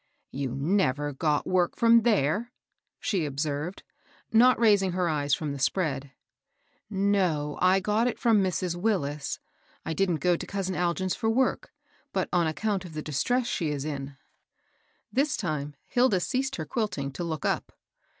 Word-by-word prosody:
"You 135 -2 -3
never 145 -2 +1
got 150 +1 0
work 180 -2 +1
from 230 0 +5
there," 215 - +1 0.5
she 180 -8 0
ob 140 -1 -6
served, 150 +4 -3 0.5
not 250 +3 +6
raising 205 -5 +4
her 180 -1 +1
eyes 145 -3 +1
from 150 -2 -4
the 140 - -6
spread. 140 -2 -1 0.5
*' - - -42 0.2
No; 155 -7 +1
I 185 +1 +5
got 215 +4 +1
it 245 - -2
from 225 -4 +3
Mrs. 185 -2 -1
Willis. 175 -7 -1 0.5
I 165 - -2
didn't 185 0 +1
go 175 +2 +2
to - - -6
cousin 195 -1 -2
Algin's 180 +1 0
for 220 - -1
work, 255 +3 +1 0.4
but - - 0
on 175 -2 +3
account 195 +5 -1
of 175 -3 -10
the 155 - -4
dis 145 -3 -2
tress 250 0 +1
she 170 -9 -1
is 145 -1 -3
in." 140 -2 -5 1.0
This 275 +3 +1
time, 150 -6 -3
Hilda 245 -6 +3
ceased 265 +8 -1
her - - -4
quilting 205 - -2
to 175 - -5
look 160 -3 -3
up. - - -1
180 Hz, 170 wpm, -27 LUFS, 150-210 Hz, 1.0 s, not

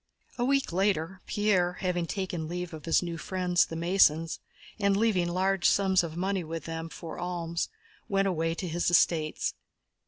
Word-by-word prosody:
A - - +2
week 275 -6 +1
later, 185 -1 0
Pierre, 190 -4 +2
having 180 -2 -2
taken 180 -5 -3
leave 175 0 -4
of 155 - -8
his 165 +2 +3
new 170 -1 -4
friends, 180 0 +1
the 165 - -6
Masons, 165 -2 +3 0.4
and 200 -1 +3
leaving 200 -5 +2
large 190 +1 +2
sums 190 -2 +3
of 165 -1 -5
money 190 0 -1
with 165 +1 -6
them 165 0 -5
for 165 0 -8
alms, 170 -2 -2 0.4
went 195 0 +2
away 165 -2 0
to 180 - -4
his 170 +1 0
estates. 160 -2 +2
175 Hz, 165 wpm, -29 LUFS, 165-190 Hz, 0.4 s, his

